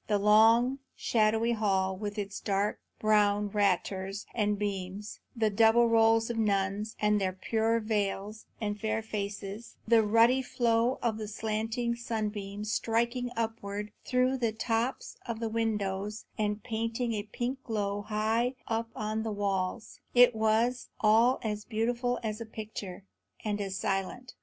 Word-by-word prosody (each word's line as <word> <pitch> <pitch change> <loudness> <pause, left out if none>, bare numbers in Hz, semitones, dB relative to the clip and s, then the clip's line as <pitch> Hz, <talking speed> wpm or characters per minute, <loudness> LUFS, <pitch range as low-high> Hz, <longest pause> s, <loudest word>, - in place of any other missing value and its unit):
The 210 - +2
long, 225 +5 +5 0.2
shadowy 225 +1 +2
hall, 190 -4 +1
with 205 +2 -5
its 200 -1 -4
dark 200 0 0 0.2
brown 210 -1 +3
raters 195 0 0
and 210 -2 +1
beams; 200 0 -4 0.2
the 220 -2 +1
double 225 +3 +5
rows 225 0 +4
of 230 - -3
nuns, 200 0 0
with 210 0 +3
their 190 -1 0
pure 225 +4 0
veils 210 -1 -2
and 210 -2 -3
fair 220 0 -1
faces; 205 +1 -5
the 230 0 +6
ruddy 230 +4 +4
flow 240 -1 +1
of 225 -2 0
the 215 - -4
slanting 220 +3 -2
sunbeams 210 -3 -3
striking 235 +2 0
upwards 210 -2 -3
through 255 +1 +2
the 230 -2 +1
tops 225 +3 -2
of 230 -2 -3
the 230 -1 -2
windows 210 -2 -2
and 210 -1 -1
painting 230 0 -2
a 210 - -1
pink 240 +5 -4
glow 205 -3 -2
high 220 +4 0
up 225 0 -1
on 215 +1 -2
the 220 0 -3
walls, 200 0 -2 0.2
it 245 0 +7
was 220 +3 +1
all 225 +4 +5
as 210 -1 -2
beautiful 240 +2 -1
as 215 0 -3
a - - -4
picture, 205 -4 -7 0.4
and 210 -1 -1
as 195 -1 -3
silent. 195 +8 -2
220 Hz, 145 wpm, -30 LUFS, 205-230 Hz, 0.4 s, it